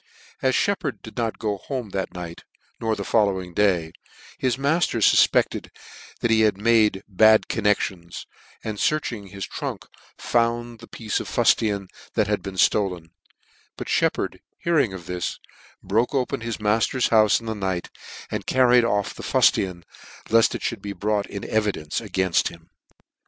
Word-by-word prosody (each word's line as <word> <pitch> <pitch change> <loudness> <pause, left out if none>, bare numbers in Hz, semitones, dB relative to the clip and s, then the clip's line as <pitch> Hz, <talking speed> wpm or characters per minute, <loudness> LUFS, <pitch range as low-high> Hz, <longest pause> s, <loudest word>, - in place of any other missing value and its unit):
As 130 -1 +2
Sheppard 180 -9 -1
did 110 - -10
not 115 -2 -2
go 105 -2 -2
home 125 -5 -5
that 95 -1 -3
night, 85 -2 -8 0.4
nor 110 -1 0
the 100 - -4
following 95 -5 +1
day, 90 -5 +2 0.5
his 125 -2 0
mailer 140 +5 +1
fulpecteti 115 - +3 0.5
that 120 - +1
he 110 0 +4
had 105 -3 +3
made 105 -2 +3
bad 110 +2 +5
connections, 95 -5 -1 0.4
and 110 -2 -4
fearching 120 -10 -1
his 100 0 -6
trunk, - - -5 0.3
found 120 0 0
the 115 - -12
piece 110 -2 -3
of - - -6
fuftian 100 -3 +2 0.3
that 110 - +3
had 105 -1 -1
been 95 +1 -7
ftolen; 90 -4 +1 0.7
but - - -6
Sheppard, - - 0 0.2
hearing 155 - +1
of 95 -3 -8
this, 90 +1 -3 0.5
broke 115 +7 0
open 125 -3 -1
his 115 -1 -3
mafter's 110 +4 +1
houfe 110 -2 +5
in 115 - -12
the 110 - -2
night, 95 -4 -3 0.4
and - - -4
carried 125 -2 +5
off 105 -3 0
the - - -10
fnitian, 90 -3 +2 0.5
left 115 0 +4
it - - -6
fhould - - -3
be 100 -1 -5
brought 105 0 -1
in 100 - -7
evi 105 -2 0
dence 75 -1 -4
againft 95 -2 +1
him. 85 -1 -11
105 Hz, 160 wpm, -24 LUFS, 95-115 Hz, 0.7 s, bad